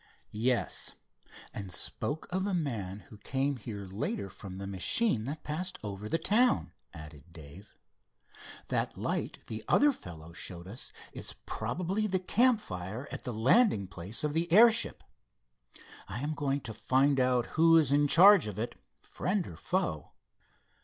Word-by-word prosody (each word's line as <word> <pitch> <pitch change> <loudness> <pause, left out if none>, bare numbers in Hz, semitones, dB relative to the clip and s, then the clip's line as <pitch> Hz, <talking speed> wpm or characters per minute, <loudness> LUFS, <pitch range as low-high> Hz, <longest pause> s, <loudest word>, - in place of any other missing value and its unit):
"Yes, 120 +3 0 0.6
and 100 -2 -6
spoke 145 - -2
of 190 +2 -1
a 195 - 0
man 105 - -3
who 105 - -12
came 135 +5 -1
here 105 -5 -7
later 95 0 -4
from 95 -2 -9
the 100 - -6
machine 110 - +1
that 145 +4 -5
passed 180 +5 -3
over 105 0 -6
the 165 - +1
town," 200 - +2 0.2
added 75 -2 -11
Dave. 85 +5 -13 0.9
"That - - -1
light - - -3
the 110 -1 -6
other 290 0 +5
fellow 85 - -11
showed 85 0 -5
us 110 +7 -8 0.2
is - - -6
probably 190 +5 -2
the 190 -2 +1
campfire 180 - 0
at - - -7
the 125 - -2
landing 120 - +3
place 95 - -4
of 150 -1 -1
the 165 +1 -1
airship. 225 +4 +5 1.0
I 110 +7 -5
am 150 +1 -1
going 140 -1 -1
to 110 - -6
find 135 +5 +2
out 125 -2 +2
who 165 +1 +6
is 150 -5 +3
in 145 +1 +4
charge 190 - +7
of 105 - -6
it, 120 +2 -3 0.3
friend 185 -1 -2
or - - -9
foe." 180 - -2
130 Hz, 155 wpm, -30 LUFS, -, 1.0 s, charge